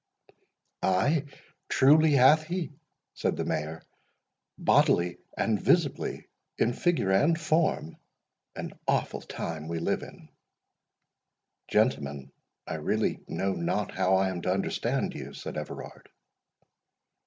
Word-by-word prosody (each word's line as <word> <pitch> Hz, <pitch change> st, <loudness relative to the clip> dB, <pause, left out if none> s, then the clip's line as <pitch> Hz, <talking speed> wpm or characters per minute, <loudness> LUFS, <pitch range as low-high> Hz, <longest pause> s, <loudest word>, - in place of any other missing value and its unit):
"Ay, 140 Hz, -, +2 dB, 0.4 s
truly 150 Hz, +3 st, +5 dB
hath 145 Hz, +4 st, +6 dB
he," 175 Hz, -1 st, -3 dB, 0.4 s
said -, -, -1 dB
the -, -, -2 dB
Mayor, 80 Hz, +2 st, -3 dB, 0.7 s
"bodily 85 Hz, 0 st, +3 dB, 0.2 s
and 110 Hz, -3 st, +1 dB
visibly, 170 Hz, -6 st, +1 dB, 0.3 s
in 120 Hz, -, +2 dB
figure 165 Hz, -, +1 dB
and 155 Hz, -, +3 dB
form—An 155 Hz, -, -3 dB
awful -, -, 0 dB
time 80 Hz, -1 st, -5 dB
we 85 Hz, 0 st, -3 dB
live 80 Hz, -, -1 dB
in!" -, -, -12 dB, 1.4 s
"Gentlemen, 70 Hz, -, 0 dB, 0.3 s
I -, -, -4 dB
really -, -, 0 dB
know 95 Hz, 0 st, -1 dB
not 90 Hz, +4 st, -1 dB
how 95 Hz, +1 st, +2 dB
I 95 Hz, 0 st, +2 dB
am 90 Hz, -2 st, -4 dB
to 90 Hz, -, 0 dB
understand 95 Hz, +1 st, -1 dB
you," 70 Hz, +1 st, -8 dB
said -, -, -7 dB
Everard. 75 Hz, -, -7 dB
95 Hz, 110 wpm, -28 LUFS, -, 1.4 s, hath